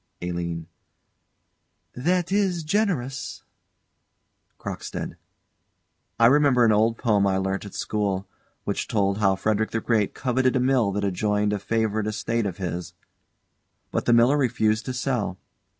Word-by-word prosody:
ALINE. 85 -2 -3 1.3
That 175 +7 0
is 190 -4 +1
generous. 155 - -1 1.1
CROCKSTEAD. - - -5 1.0
I 115 - +6
remember 135 -1 +5
an 110 - +5
old 110 +2 +3
poem 105 -4 +2
I 95 -1 +1
learnt 95 +1 -2
at 100 - -9
school 100 -3 -1 0.4
which - - -2
told 100 -1 +1
how 95 -2 +3
Frederick 110 +2 0
the 115 - -1
Great 110 -3 0
coveted 130 0 +1
a - - +3
mill 125 -5 +2
that 100 +1 -2
adjoined 105 +2 +1
a 105 - -1
favourite 110 0 0
estate 110 +1 -1
of 90 - -5
his; 90 -2 -4 1.0
but - - -1
the 120 - +4
miller 120 +5 +5
refused 110 -4 +1
to 130 - -3
sell. 125 -7 -1
110 Hz, 135 wpm, -25 LUFS, 100-125 Hz, 1.3 s, I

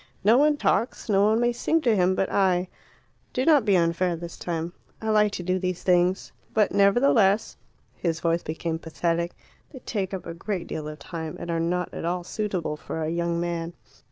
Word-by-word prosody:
No 215 +4 +6
one 295 0 +4
talks, 235 -3 0
no 200 -1 +4
one 220 +2 +3
may 240 0 +2
sing 320 +7 +1
to 235 -6 +3
him 185 -1 +3
but 190 - +1
I. 185 -2 +2 0.6
Do 255 - 0
not 300 -7 +5
be 200 -3 +4
unfair 170 +1 +1
this 170 0 -8
time; 170 0 -4 0.3
I 220 - -3
like 210 -1 +4
to 180 - -4
do 185 +1 0
these 185 -1 -3
things. 180 +1 +2 0.2
But 215 -2 +3
nevertheless 200 0 +3 0.4
(his 165 -2 -2
voice 165 +1 +1
became 160 +1 -3
pathetic) 170 +1 -1 0.4
they 270 - -11
take 205 -6 -3
up 190 -2 -5
a 170 - -5
great 180 +1 -4
deal 155 -1 -5
of 150 0 -7
time, 160 -2 -6
and 170 - -4
are 165 - 0
not 180 +2 -1
all 175 +2 -2
suitable 180 -6 -3
for 160 +1 -5
a 155 - -1
young 170 0 -1
man." 170 0 -3
180 Hz, 195 wpm, -25 LUFS, 170-210 Hz, 0.6 s, No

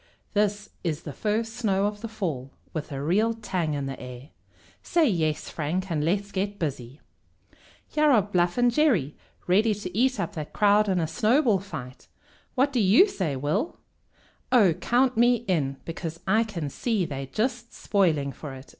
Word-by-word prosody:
This 210 0 0
is 165 -2 -2
the 145 - -6
first 220 - -1
snow 200 -5 +1
of 205 0 -3
the 230 - -4
fall, 165 - -4 0.2
with 155 -1 -5
a 140 0 -4
real 215 +9 +2
tang 175 -8 -2
in 140 -1 -2
the 135 0 -5
air. 125 +2 -9 0.5
Say 335 -3 +2
yes, 160 - 0
Frank, 175 +5 -3
and 150 -2 0
let's 200 +5 0
get 200 +1 -2
busy!" 135 -4 -4 0.9
"Here 305 0 +2
are 230 -8 +5
Bluff 180 -2 0
and 245 0 +4
Jerry 230 - +2 0.3
ready 210 +4 +3
to 185 -3 -7
eat 255 +3 +2
up 205 - -2
that 155 -4 -6
crowd 210 0 +4
in 185 -2 +2
a 165 - +1
snowball 225 - +2
fight. 130 -10 -9 0.5
What 275 +2 +2
do 250 - +2
you 215 - +6
say, 185 - -2
Will?" 155 - -1 0.7
"Oh, 210 -9 +5
count 250 +8 +1
me 240 0 +3
in, 140 -7 0
because 165 0 -5
I 220 +4 +3
can 170 -10 -5
see 220 - 0
they're 135 -3 -5
just 235 - -2
spoiling 160 -9 +1
for 135 +1 -8
it!" 130 +1 -12
195 Hz, 175 wpm, -26 LUFS, 155-225 Hz, 0.9 s, you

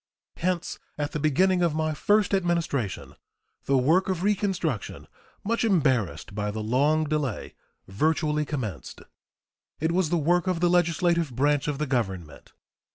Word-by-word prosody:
Hence 180 0 -2 0.2
at 145 -1 -2
the 150 - -3
beginning 180 +5 +2
of 170 -3 +1
my 155 0 0
first 205 +6 +2
Administration 170 - -1 0.5
the 135 - +2
work 160 +10 +3
of 185 -2 -2
reconstruction, 190 - -1 0.4
much 230 +3 0
embarrassed 130 - +1
by 105 0 -2
the 110 +1 -4
long 145 +8 +2
delay, 150 -6 -3 0.3
virtually 150 - 0
commenced. 115 - -5 0.8
It 160 +2 0
was 175 -2 +1
the 175 - +1
work 175 +4 +1
of 180 -2 0
the 175 0 +2
legislative 170 -2 +2
branch 145 +2 +1
of 145 -2 -1
the 150 - -1
Government. 95 - -3
155 Hz, 145 wpm, -26 LUFS, 130-175 Hz, 0.8 s, work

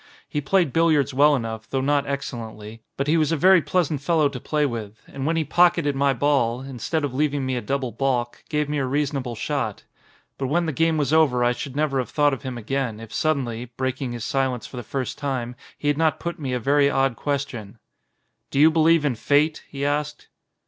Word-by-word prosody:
He 150 - -2
played 170 0 +1
billiards 155 -4 +3
well 145 +2 +5
enough, 110 -3 -5
though 135 - -1
not 140 +1 +1
excellently, 115 -5 -6 0.2
but 140 - 0
he 155 +3 +2
was 155 -1 +2
a 165 - +1
very 185 +3 +6
pleasant 155 -5 0
fellow 155 -1 +2
to 135 -2 -7
play 150 +4 0
with; 115 -5 -5
and 135 +1 -5
when 165 - +1
he 165 - +1
pock 175 +4 +4
eted 145 -4 0
my 140 0 +2
ball, 130 -2 +1
instead 135 +4 -3
of 140 -3 -2
leaving 145 0 0
me 130 0 -1
a 125 - -2
double 130 +2 -2
balk, 120 0 -1
gave 150 -1 0
me 150 0 -1
a 135 - 0
reasonable 135 -3 -1
shot. - - -3 0.6
But 135 - -1
when 170 +5 +1
the 160 - -1
game 165 +3 +2
was 145 0 0
over 140 -6 +4
I 120 - +3
should 130 +2 -6
never 145 -2 +1
have 125 - -3
thought 145 -1 +2
of 135 - -4
him 130 -3 -5
again, 120 -1 -2
if 115 -1 -10
suddenly, 125 -7 -1
breaking 130 -1 -2
his 120 -2 -5
silence 130 -3 -1
for - - -10
the - - -3
first 130 +2 -4
time, 130 -4 -3 0.2
he 145 - -4
had 145 +1 +1
not 160 -1 +2
put 170 -1 -4
me 135 -4 -3
a 125 - 0
very 140 +3 +3
odd 135 -3 +1
question. 130 -8 -4 0.7
"Do 140 - -1
you 155 +2 +7
believe 160 -1 +4
in 140 - +2
fate?" 145 +6 +1
he 140 0 -4
asked. 145 +1 -2
140 Hz, 220 wpm, -23 LUFS, 125-150 Hz, 0.7 s, you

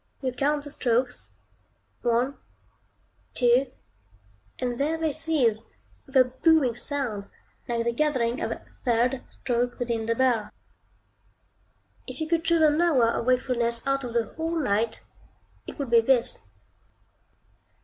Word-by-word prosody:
You 260 - 0
count 285 +3 0
the 290 - -9
strokes 245 - -1 0.7
one 245 +3 +1 1.0
two, 245 +2 +4 0.9
and 245 -1 -3
there 310 +3 0
they 320 -1 0
cease, 280 -8 +1 0.5
with 270 0 0
a 260 - +8
booming 260 +1 +2
sound, 240 -4 -3 0.4
like 235 -1 -1
the 235 - +1
gathering 250 -3 0
of - - -1
a - - -6 0.2
third 245 +1 +1
stroke 245 -1 -2
within 230 -2 -2
the 230 - +1
bell. 235 -4 +1 1.6
If - - -7
you 315 - -2
could 330 0 +1
choose 335 -1 +3
an 305 +1 +4
hour 270 -10 +4
of 235 - -3
wakefulness 245 -2 +1
out 275 0 0
of 240 -2 -5
the 235 -1 +2
whole 325 +5 -4
night, 225 -7 0 0.6
it - - -8
would 275 -5 -4
be 230 -1 +7
this. 245 0 +1
250 Hz, 140 wpm, -26 LUFS, 235-290 Hz, 1.6 s, a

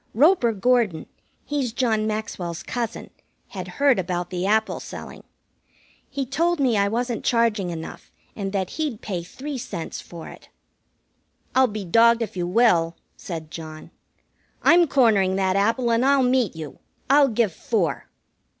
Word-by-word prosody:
Roper 285 - +4
Gordon 220 -5 +1 0.4
he's 275 -6 -2
John 220 -4 +1
Maxwell's 180 -6 -4
cousin 235 -2 -4 0.4
had - - -6
heard 280 -6 +4
about 180 -1 -3
the 180 +1 -2
apple 220 +1 +1
selling. - - -9 0.9
He 275 -1 -3
told 335 +6 0
me 255 -5 +2
I 200 -1 +3
wasn't 235 +2 -2
charging 230 -6 +1
enough, 165 -1 -8 0.2
and 195 -2 -4
that 190 -2 -2
he'd 275 -8 -2
pay 185 -4 -3
three 265 - -7
cents 170 -7 -6
for 170 -2 -10
it. - - -14 1.0
"I'll 260 0 +5
be 210 -3 -5
dogged 230 +5 +4
if 210 - -7
you 175 -1 -2
will," 180 -5 +3 0.2
said 160 -3 -7
John. 155 -1 -9 0.7
"I'm 345 0 +6
cornering 215 -9 +3
that 190 -1 +1
apple, 230 +4 +1
and 230 +2 +2
I'll 275 0 +4
meet 250 -7 +1
you. 155 -3 -8 0.3
I'll 280 +1 +5
give 225 -6 +1
four." 195 -5 -1
220 Hz, 150 wpm, -23 LUFS, 185-250 Hz, 1.0 s, I'm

